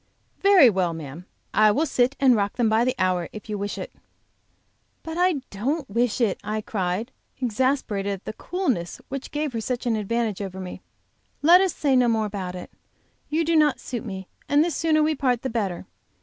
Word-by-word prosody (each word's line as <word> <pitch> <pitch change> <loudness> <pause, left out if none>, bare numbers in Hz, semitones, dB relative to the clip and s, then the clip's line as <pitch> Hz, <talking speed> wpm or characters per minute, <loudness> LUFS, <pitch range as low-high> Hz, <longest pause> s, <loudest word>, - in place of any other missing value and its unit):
"Very 390 -8 +7
well, 185 -6 +1
ma'am, 160 +3 -9 0.3
I 215 0 +5
will 280 +10 +2
sit 260 -2 +1
and 260 -3 +5
rock 200 -1 0
them 240 -2 +2
by 220 +2 +3
the 255 +1 0
hour 180 -3 0
if 215 0 -10
you 210 - -3
wish 205 0 -4
it." - - -6 1.1
"But 325 0 -6
I 350 -5 +2
don't 270 +9 -2
wish 235 +1 +1
it," 225 -6 +1
I 215 0 -2
cried, 200 +3 -2 0.3
exasperated 240 -4 0
at 195 - -9
the - - -5
coolness 260 - -2
which 275 0 -5
gave 295 -2 -2
her 225 - -2
such 250 +2 -3
an 235 -2 +1
advantage 220 -1 -1
over 190 -1 -5
me. 185 -1 -7 0.6
"Let 345 +4 +8
us 380 -3 0
say 280 -3 +2
no 250 -1 +4
more 220 -2 +1
about 190 -3 -5
it; 180 - -8 0.6
you 320 +2 +1
do 330 +1 +2
not 300 -3 +4
suit 245 -1 -5
me, 190 -5 -7 0.2
and 290 +2 +4
the 345 - -1
sooner 310 0 +2
we 310 +1 +2
part 255 -4 0
the 265 - -2
better. 200 -7 -2
235 Hz, 200 wpm, -24 LUFS, 200-280 Hz, 1.1 s, Let